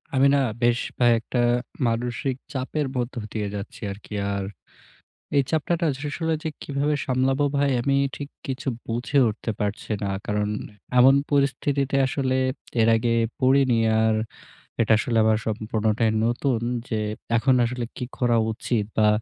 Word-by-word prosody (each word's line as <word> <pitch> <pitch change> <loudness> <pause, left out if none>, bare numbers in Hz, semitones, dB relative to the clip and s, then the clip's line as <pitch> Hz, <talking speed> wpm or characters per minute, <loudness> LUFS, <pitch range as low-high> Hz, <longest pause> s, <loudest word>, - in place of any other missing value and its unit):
আমি 135 +1 +5
না - - +3 0.2
বেশ 120 0 +3 0.2
কয়েকটা 120 0 +2 0.5
মানসিক 120 +3 -1 0.2
চাপের 140 +2 -2
মধ্যে 125 0 -2
দিয়ে 105 -2 -2
যাচ্ছি 100 0 -7
আর 100 - -7
কি। - - -10 0.2
আর 100 - -2 0.9
এই 140 - +5
চাপটা 170 +2 0
আসলে 150 +4 -3 0.3
কিভাবে 145 +1 0
সামলাবো 130 +2 +1
ভাই, 140 0 +2
আমি 140 +2 +1 0.2
ঠিক 145 - -6 0.2
কিছু 135 +1 -4 0.2
বুঝে 120 +5 -1
উঠতে 110 +1 -4
পারছি 105 +1 -3
না। 100 - -1 0.2
কারণ 105 0 0 0.5
এমন 130 +2 +8 0.2
পরিস্থিতিতে 140 -1 +1
আসলে 130 -1 0 0.4
এর 110 - +4
আগে 115 +1 0 0.3
পড়িনি, 130 -2 +4 0.2
আর 110 0 +3 0.7
এটা 110 -1 +4
আসলে 115 +1 0
আমার 110 0 +3
সম্পূর্ণটাই 110 0 0
নতুন, 120 0 0 0.3
যে 110 - -1 0.4
এখন 125 +4 +3
আসলে 120 0 -3
কি 125 - -3
করা 120 -2 +2
উচিত? 110 -1 -1
বা 110 -1 +5
125 Hz, 140 wpm, -24 LUFS, 110-140 Hz, 0.9 s, এমন